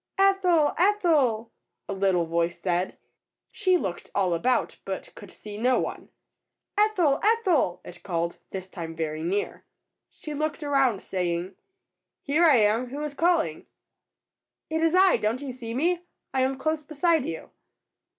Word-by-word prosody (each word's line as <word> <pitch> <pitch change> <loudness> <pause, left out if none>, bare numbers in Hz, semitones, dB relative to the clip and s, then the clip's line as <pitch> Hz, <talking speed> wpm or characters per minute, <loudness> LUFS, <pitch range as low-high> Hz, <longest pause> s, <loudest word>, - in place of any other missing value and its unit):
''Ethel! 375 -6 +3
Ethel!'^ 310 - +2 0.4
a - - -3
little 190 -3 +1
voice 170 +1 -1
said. 180 0 -1 0.5
She 370 -3 +2
looked 185 - -5
all 190 -3 +2
about, 245 +10 0
but - - -6
could - - -12
see 210 0 -10
no 250 +2 +3
one. - - -5 0.7
''Ethel! 390 -9 +3
Ethel 390 - +2
!^' - - -12
it 175 - -11
called, 170 -2 -2
this 190 -1 -6
time 165 -3 -7
very 155 -1 -3
near. 190 +5 -2 0.5
She 305 - -8
looked 305 +1 -2
around, 270 -8 +2
saying, 180 0 -2 0.7
"Here 300 +5 +1
I 305 -4 +7
am; 220 +2 +3
who 285 +4 -5
is 300 -2 -4
calling?^^ 335 +2 +1 1.1
"It 320 0 0
is 330 +1 +3
I. 375 0 +6
DonT 225 +5 -1
you 275 - -4
see 235 -2 -7
me? 340 +6 +1 0.3
I 265 - +2
am 265 +1 +1
close 310 +3 -1
beside 310 0 +1
you. 160 - -6
260 Hz, 150 wpm, -26 LUFS, -, 1.1 s, I